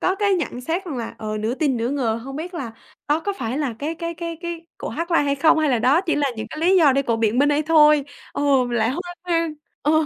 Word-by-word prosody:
có 375 - +1
cái 400 0 +2
nhận 290 -7 -3
xét 335 +8 -2
rằng 305 -7 -5
là, 230 - -5
ờ, 215 -1 -4
nửa 220 +4 -1
tin 280 -4 0
nửa 235 +2 -1
ngờ, 255 -6 0
hông 270 +1 -7
biết 350 +3 -6
là 245 -8 -5 0.4
đó 300 +2 +2
có 405 +5 -2
phải 240 +3 -2
là 275 -7 -1
cái 305 +3 -3
cái 335 0 -5
cái 335 0 -5
cái 340 -1 -6
cổ - - -5
hát 340 +1 -4
live 335 - +4
hay 280 0 +1
không 315 +3 +4
hay 310 -2 +2
là 245 - +2
đó 260 +8 +4
chỉ 360 -4 -1
là 285 -2 +1
những 220 0 -4
cái 310 - -7
lý 370 +3 +4
do 305 -7 +6
để 275 +1 +2
cô 230 -3 0
biện 225 +1 +1
minh 285 +2 +4
đây 295 +1 +2
thôi. 300 -2 +5 0.3
Ừ, 285 - -3 0.3
mình 240 -1 -1
lại 220 - +2
hoang 350 +4 -5
hoang. 330 -3 0 0.3
Ờ. 300 - +2
295 Hz, 285 wpm, -22 LUFS, 250-335 Hz, 0.4 s, do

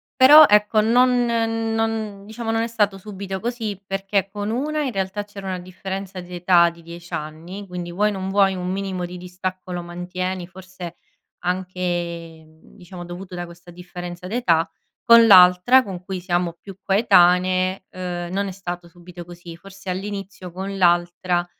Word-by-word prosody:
però, 290 +4 +9
ecco 210 0 +4
non 245 +2 +3
non 225 -3 -1
diciamo 225 +2 -6
non 225 - +1
è 230 - -1
stato 210 -4 0
subito 195 -1 -6
così 225 -4 -3
perché 195 0 -1
con 205 0 -4
una 300 +5 -1
in 260 -5 -3
realtà 195 +2 -3
c’era 200 -1 -9
una 185 -1 -3
differenza 190 +1 -7
d’età 175 -1 +3
di 170 0 -15
10 170 +1 -12
anni. 170 +6 -6
Quindi 175 -1 -6
vuoi 205 +4 +1
o - - -4
non 190 0 -4
vuoi, 195 -1 +3
un 180 0 -4
minimo 190 -2 -3
di 180 +1 -8
distacco 180 0 -6
lo 175 - -3
mantieni, 180 +1 -5
forse 185 -2 -10 0.4
anche, 180 +1 -3 0.6
mhmm, 160 +6 -22
diciamo 180 -1 -10
dovuto 180 +1 -8
da 175 - -4
questa 175 +1 -14
differenza 175 0 -8
d’età. 180 -7 +1 0.3
Con 230 -1 +7
l’altra 180 +7 +7
con 185 -5 -7
cui 190 -2 -5
siamo 175 -1 -1
più 195 -2 -11
coetanee, 185 -2 +3
ehm, 175 -1 -5
non 200 +1 -1
è 190 - -4
stato 175 -2 -7
subito 175 0 -12
così. 175 -1 -11
Forse 195 +1 -11
all’inizio 195 -1 -5
con 195 +2 -5
l’altra, 175 0 +2
185 Hz, 165 wpm, -22 LUFS, 175-205 Hz, 0.6 s, però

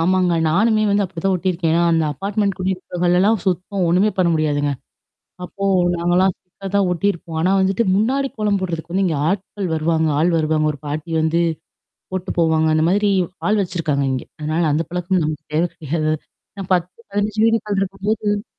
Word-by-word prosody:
ஆமாங்க, 180 +1 +2
நானுமே 215 +6 +3
வந்து 200 0 +2
அப்படித்தான் 190 +1 -1
ஒட்டியிருக்கேன். 170 -2 0
அந்த 165 -1 +2
அப்பார்ட்மென்ட் 200 +4 -1
குடியே 190 +1 0
இருக்குறவங்கள் 180 -1 -1
எல்லாம் 210 +4 +3
சுத்தம் 185 +1 -1
ஒண்ணுமே 185 +5 +3
பண்ண 185 -2 +3
முடியாதுங்க. 145 -2 0 0.7
அப்போ 195 +2 -5 0.3
நாங்க 175 +1 0
எல்லாம் 190 +1 +4
ஸ்டிக்கர் 195 +2 -11
தான் 200 -2 +3
ஒட்டியிருப்போம். 175 -2 -2
ஆனா 185 +3 +2
வந்துட்டு 190 +4 +2
முன்னாடி 260 +7 +1
கோலம் 210 -2 +1
போடுறதுக்கு 170 -2 -4
வந்து 195 +1 +2
இங்க 160 -5 0
ஆட்கள் 195 -1 -3
வருவாங்க 160 0 +1
ஆள் 175 +2 +3
வருவாங்க. 155 -1 +1
ஒரு 145 - -11
பாட்டி 155 +3 -4
வந்து 160 +2 +1 0.7
போட்டுட்டு 185 -1 -4
போவாங்க. 160 -1 +3
அந்த 155 +1 +2
மாதிரி 205 +2 +2 0.4
ஆள் 210 0 +2
வச்சிருக்காங்க 160 -6 -1
இங்க. 130 - -2 0.2
அதனால 155 +2 -1
அந்த 155 +2 0
பழக்கம் 180 +1 0
நமக்குத் 150 0 -5
தேவை 170 +3 +2
கிடையாது 155 +1 -3
அது - - +2 0.4
ஏன்னா 195 - -5
10, 180 -1 +1 0.2
15 205 +1 -2
வீடுகள் 215 -3 +1
இருக்கும்போது 205 +2 -1
180 Hz, 170 wpm, -20 LUFS, 160-200 Hz, 0.7 s, எல்லாம்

